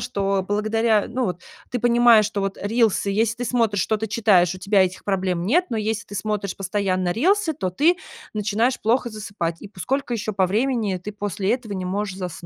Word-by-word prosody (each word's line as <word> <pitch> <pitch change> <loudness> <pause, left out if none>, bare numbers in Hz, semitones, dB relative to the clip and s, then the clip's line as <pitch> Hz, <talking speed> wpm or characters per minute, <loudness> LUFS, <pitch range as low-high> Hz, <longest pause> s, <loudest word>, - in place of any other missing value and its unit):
что 195 -1 -1
благодаря, 215 +1 +1
ну, 245 0 -1
вот 180 -1 -4 0.3
ты 250 - -1
понимаешь, 235 -2 +5
что 205 0 -2
вот 195 0 -2
рилсы, 215 -1 +1
если 225 +3 +1
ты 245 - -4
смотришь, 225 -5 +1
что-то 220 0 -1
читаешь, 195 -6 +3
у 185 - -9
тебя 195 +1 +3
этих 185 0 -3
проблем 185 -3 -1
нет. 350 - +3
Но 230 - -1
если 220 +1 -2
ты 205 - -10
смотришь 200 -2 -3
постоянно 185 -2 -1
рилсы, 360 - +2
то 185 -11 -3
ты 320 - +3 0.4
начинаешь 215 +4 0
плохо 240 +2 +1
засыпать. 200 -6 -4
И - - -8
по 195 - -18
сколько 265 - -1
еще 215 -1 -3
по 190 -2 +2
времени 220 -1 0
ты 205 +4 -7
после 205 0 -2
этого 240 -4 -3
не 185 -1 -4
можешь 200 +1 -3
заснуть? 180 -3 -5
210 Hz, 200 wpm, -22 LUFS, 190-230 Hz, 0.4 s, понимаешь